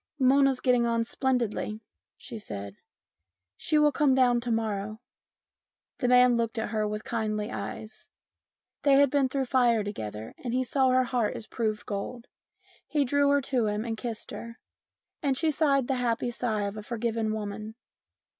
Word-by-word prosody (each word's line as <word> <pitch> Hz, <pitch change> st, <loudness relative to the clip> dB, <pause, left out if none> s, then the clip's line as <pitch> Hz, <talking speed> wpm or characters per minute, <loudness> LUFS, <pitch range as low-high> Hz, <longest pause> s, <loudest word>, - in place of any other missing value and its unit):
" 310 Hz, -, -50 dB
Mona's 270 Hz, 0 st, +4 dB
getting 245 Hz, -2 st, +3 dB
on 230 Hz, 0 st, +1 dB
splendidly," 235 Hz, -4 st, -1 dB, 0.4 s
she 235 Hz, -4 st, -8 dB
said. 100 Hz, -, -7 dB, 0.4 s
" 85 Hz, -, -58 dB, 0.3 s
She 310 Hz, -, 0 dB
will 300 Hz, 0 st, +5 dB
come 275 Hz, -1 st, +3 dB
down 245 Hz, -2 st, +4 dB
to 240 Hz, -, -4 dB
morrow." 215 Hz, -2 st, -2 dB, 1.0 s
The 250 Hz, -, +1 dB
man 250 Hz, 0 st, +6 dB
looked 230 Hz, 0 st, -1 dB
at 220 Hz, -, -2 dB
her 215 Hz, -1 st, 0 dB
with 210 Hz, +1 st, -4 dB
kindly 215 Hz, -2 st, -2 dB
eyes. 215 Hz, 0 st, -7 dB, 0.7 s
They 280 Hz, -, +4 dB
had 280 Hz, -1 st, +5 dB
been 280 Hz, -2 st, +2 dB
through 270 Hz, 0 st, 0 dB
the -, -, -7 dB
fire 240 Hz, -4 st, +3 dB
together 110 Hz, -, -6 dB
and 245 Hz, -1 st, -2 dB
he 255 Hz, -, +2 dB
saw 260 Hz, +1 st, +2 dB
her 255 Hz, 0 st, +4 dB
heart 245 Hz, -3 st, 0 dB
as 220 Hz, -, -6 dB
proved 215 Hz, -2 st, -2 dB
gold. 225 Hz, +4 st, -5 dB, 0.6 s
He 295 Hz, -2 st, +1 dB
drew 285 Hz, +2 st, +3 dB
her 285 Hz, 0 st, +4 dB
to 255 Hz, -4 st, 0 dB
him 210 Hz, +2 st, -2 dB
and 225 Hz, -1 st, -2 dB
kissed 230 Hz, 0 st, -6 dB
her, 230 Hz, 0 st, -8 dB, 0.6 s
and 275 Hz, -3 st, +1 dB
she 320 Hz, +1 st, +2 dB
sighed 275 Hz, -4 st, +2 dB
the 270 Hz, -, +1 dB
happy 240 Hz, 0 st, 0 dB
sigh 220 Hz, -3 st, -1 dB
of 200 Hz, +1 st, -4 dB
a -, -, -5 dB
forgiven 225 Hz, 0 st, -2 dB
woman. 215 Hz, 0 st, -5 dB
235 Hz, 180 wpm, -28 LUFS, 215-260 Hz, 1.0 s, man